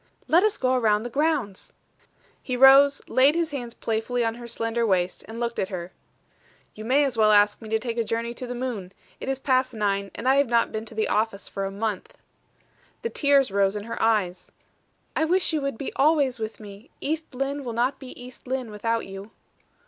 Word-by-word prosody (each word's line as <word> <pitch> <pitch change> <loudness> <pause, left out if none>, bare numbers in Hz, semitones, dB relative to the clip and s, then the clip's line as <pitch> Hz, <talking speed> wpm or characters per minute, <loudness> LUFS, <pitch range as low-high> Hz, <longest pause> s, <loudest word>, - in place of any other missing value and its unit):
"Let 335 +3 +5
us 430 0 +1
go 255 0 +1
around 220 -4 +2
the 240 - -6
grounds." 280 -9 -1 0.7
He 250 -2 -3
rose, 275 +2 +7
laid 275 +4 +4
his 335 -2 0
hands 245 -5 -6
playfully 230 +2 -1
on 225 - 0
her 240 0 -9
slender 230 0 -2
waist, 185 -4 0
and 225 +2 -7
looked 235 -1 -2
at 190 - -1
her. 180 -2 -6 0.8
"You 215 - -9
may 270 +5 +3
as 265 -4 -1
well 215 -1 +5
ask 205 +1 +4
me 220 - -9
to 220 - +2
take 235 +1 -4
a - - +2
journey 230 +1 -3
to 250 +1 -7
the 245 - -5
moon. 230 -7 -4 0.3
It - - -5
is 270 - 0
past 255 -2 +1
nine, 200 -2 -1
and 250 - -4
I 265 +1 +5
have 280 -3 +3
not 235 -1 +2
been 220 0 -4
to 225 - -11
the 220 - 0
office 210 -1 -1
for 195 - -4
a 195 - -4
month." 205 -1 -4 0.9
The 465 - -2
tears 280 -5 +3
rose 200 0 +2
in 205 - -4
her 230 - -6
eyes. 205 -5 0 0.6
"I - - +1
wish 355 +1 +2
you 305 - 0
would 275 -4 -3
be 275 - -5
always 280 -4 +3
with 220 0 -5
me! 205 +3 -12
East 310 -2 -4
Lynne 275 +2 -2
will 245 - -4
not 245 +4 0
be 260 -2 -11
East 250 +1 -12
Lynne 255 -3 -3
without 230 +2 -1
you." 195 +2 -9
235 Hz, 215 wpm, -25 LUFS, 215-270 Hz, 0.9 s, rose